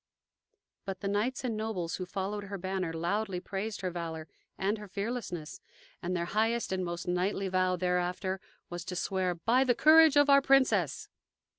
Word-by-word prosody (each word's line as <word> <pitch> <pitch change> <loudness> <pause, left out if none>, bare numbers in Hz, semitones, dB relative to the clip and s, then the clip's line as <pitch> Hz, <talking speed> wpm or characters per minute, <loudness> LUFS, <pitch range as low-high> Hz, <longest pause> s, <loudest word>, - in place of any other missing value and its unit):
But 190 -2 -6
the 200 - -2
knights 210 +7 -1
and 240 -3 -1
nobles 215 -6 -3
who 185 - -5
followed 200 +2 -3
her 200 0 -5
banner 185 -2 -2
loudly 180 +4 -1
praised 200 +3 -4
her 185 -2 -2
valor 165 -2 -5 0.3
and 205 +3 0
her 210 - -9
fearlessness, 200 -6 -5 0.4
and 180 +1 -2
their 170 - -1
highest 225 +4 0
and 190 -1 -1
most 175 0 -4
knightly 185 +2 0
vow 185 0 +2
thereafter 180 +1 -1 0.3
was 175 -2 -6
to 180 - -5
swear 185 0 -1
"By 235 +9 +3
the 250 -2 +2
courage 315 0 +7
of 290 0 +6
our 280 0 +7
Princess." 270 -1 +2
190 Hz, 170 wpm, -30 LUFS, 180-220 Hz, 0.4 s, courage